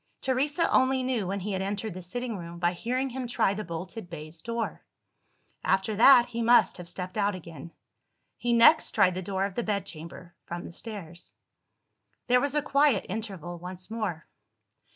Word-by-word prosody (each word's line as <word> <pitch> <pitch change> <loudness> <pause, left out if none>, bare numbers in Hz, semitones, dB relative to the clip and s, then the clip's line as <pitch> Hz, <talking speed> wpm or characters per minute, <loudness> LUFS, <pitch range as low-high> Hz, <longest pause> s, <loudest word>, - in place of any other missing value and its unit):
Teresa 285 +5 +1
only 260 0 +3
knew 245 -7 -1
when 195 +1 -2
he 205 +3 -3
had 190 -1 -1
entered 205 +1 -3
the 185 - -7
sitting 235 +6 -4
room 170 -2 -7
by 175 +1 +1
hearing 255 +7 -2
him 255 0 -4
try 235 -4 +1
the 210 +1 -4
bolted 180 +3 -7
baize 160 -1 -9
door. 230 0 -4 0.8
After 190 +3 +1
that, 240 +2 +8
he 235 -1 -4
must 240 +1 +5
have 175 -1 -8
stepped 185 +3 -5
out 205 -1 +1
again. 165 -3 -10 0.6
He 240 - -2
next 235 +7 +6
tried 195 -4 +4
the 185 - -4
door 190 +1 -1
of 200 - -4
the 240 - -1
bedchamber, 175 -5 -4
from 175 0 -6
the - - -9
stairs. 175 -6 -7 0.9
There 250 0 +4
was 285 +1 -1
a 295 - +2
quiet 280 -7 +3
interval 185 -5 -5
once 180 +3 -8
more. 200 -9 -3
200 Hz, 175 wpm, -28 LUFS, 180-240 Hz, 0.9 s, that